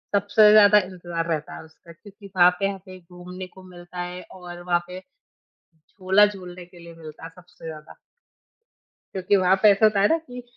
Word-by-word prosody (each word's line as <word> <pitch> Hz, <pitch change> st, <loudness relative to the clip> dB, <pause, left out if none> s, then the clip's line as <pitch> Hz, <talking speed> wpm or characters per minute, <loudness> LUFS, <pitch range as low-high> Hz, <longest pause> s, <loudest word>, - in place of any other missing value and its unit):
सबसे 205 Hz, +1 st, +4 dB
ज़्यादा 210 Hz, -1 st, +6 dB
इंतज़ार 175 Hz, -2 st, -6 dB
रहता 155 Hz, -2 st, -4 dB
है -, -, -10 dB
उसका 160 Hz, +1 st, -18 dB
क्योंकि 200 Hz, +3 st, -16 dB
वहाँ 180 Hz, 0 st, +6 dB
पे 195 Hz, -, 0 dB
हमें 190 Hz, -1 st, -9 dB
घूमने 180 Hz, +1 st, -11 dB
को 190 Hz, +1 st, -17 dB
मिलता 180 Hz, 0 st, -12 dB
है 180 Hz, +1 st, -7 dB
और 175 Hz, -1 st, -11 dB
वहाँ 175 Hz, -1 st, -1 dB
पे 180 Hz, +1 st, -9 dB, 0.7 s
झूला 190 Hz, +5 st, +1 dB
झूलने 180 Hz, -3 st, -8 dB
के 175 Hz, -1 st, -19 dB
लिए 170 Hz, 0 st, -13 dB
मिलता 155 Hz, -1 st, -13 dB
है 165 Hz, -, -8 dB
सबसे 180 Hz, -2 st, -17 dB
ज़्यादा। 155 Hz, -1 st, -11 dB, 1.1 s
क्योंकि 190 Hz, +1 st, 0 dB
वहाँ 185 Hz, 0 st, +3 dB
पे 210 Hz, -, +8 dB
ऐसा 200 Hz, +2 st, +2 dB
होता 210 Hz, -2 st, +2 dB
है 205 Hz, -, +4 dB
ना 325 Hz, -, +2 dB
कि 250 Hz, -6 st, -11 dB
180 Hz, 185 wpm, -23 LUFS, 175-200 Hz, 1.1 s, पे